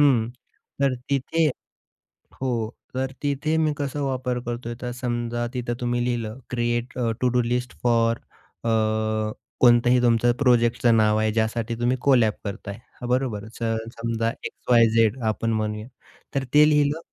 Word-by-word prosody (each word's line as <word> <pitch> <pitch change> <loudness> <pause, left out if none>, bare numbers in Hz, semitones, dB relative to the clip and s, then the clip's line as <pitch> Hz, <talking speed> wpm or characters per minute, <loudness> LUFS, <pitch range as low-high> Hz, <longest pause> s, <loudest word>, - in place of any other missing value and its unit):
हं 125 -6 +4 0.5
तर 135 -2 +3 0.2
तिथे 155 +4 +1 1.0
हो 120 -4 -1 0.3
तर 130 0 -1
तिथे 145 +2 0
मी 155 -2 +2
कसा 145 0 -3
वापर 130 -2 -1
करतोय? 120 0 -4
तर 125 -1 -3
समजा 120 -1 -2
तिथं 120 -1 -2
तुम्ही 120 0 0
लिहिलं 120 -2 -2
create 120 0 -1 0.3
to do 125 -1 +3
list 125 +1 -2
for 115 -1 +3 0.5
a, - - +1 0.9
कोणताही 120 0 +5
तुमचा 120 0 +3
प्रोजेक्टचं 120 -2 +3
नाव 105 0 +3
आहे. 110 0 +1
ज्यासाठी 115 +1 -1
तुम्ही 125 +2 +1
कोलॅब 120 -6 +4
करताय 100 0 -5 0.3
हां, 120 - -4
बरोबर 120 -5 -1
तर 115 -1 0 0.2
समजा 115 0 -1
एक्स-वाय-झेड 115 -1 +3
आपण 110 +1 0
म्हणूया. 105 +1 -2 0.5
तर 135 - +1
ते 150 +1 +7
लिहिलं, 150 +1 +2
120 Hz, 135 wpm, -24 LUFS, 115-130 Hz, 1.0 s, ते